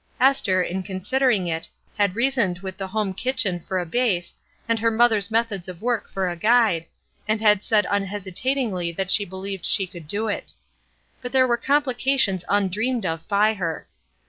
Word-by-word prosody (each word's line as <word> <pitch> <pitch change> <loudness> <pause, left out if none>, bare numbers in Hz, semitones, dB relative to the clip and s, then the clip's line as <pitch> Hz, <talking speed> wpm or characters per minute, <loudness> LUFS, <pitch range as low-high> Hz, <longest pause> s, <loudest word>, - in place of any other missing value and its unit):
Esther, 235 -9 +3
in 185 +2 -3
considering 205 +3 0
it, 165 -1 -3 0.3
had 200 -3 +1
reasoned 235 -7 +2
with 190 -1 -6
the 195 -2 -5
home 210 -1 -2
kitchen 200 -5 +1
for 185 +3 -4
a 180 - -1
base 180 -3 -1 0.3
and 230 -1 +1
her 230 +1 +2
mother's 220 -3 +3
methods 220 -5 0
of 180 -2 -8
work 240 -2 -1
for 190 -1 -2
a 175 - -3
guide, 210 -4 +3 0.4
and 215 0 +1
had 210 -2 +3
said 210 -2 +3
un 200 -1 0
hesitatingly 200 -1 -2
that 190 +2 -2
she 205 - +4
believed 190 0 -6
she 195 - +2
could 175 -4 -12
do 210 +7 -1
it. 210 - -3 0.7
But 250 -1 -5
there 260 -1 +5
were 240 -2 +2
complications 265 -6 +1
undreamed 205 +4 0
of 165 -1 -3
by 210 +2 +3
her. 170 -6 -4
205 Hz, 175 wpm, -23 LUFS, 185-235 Hz, 0.7 s, there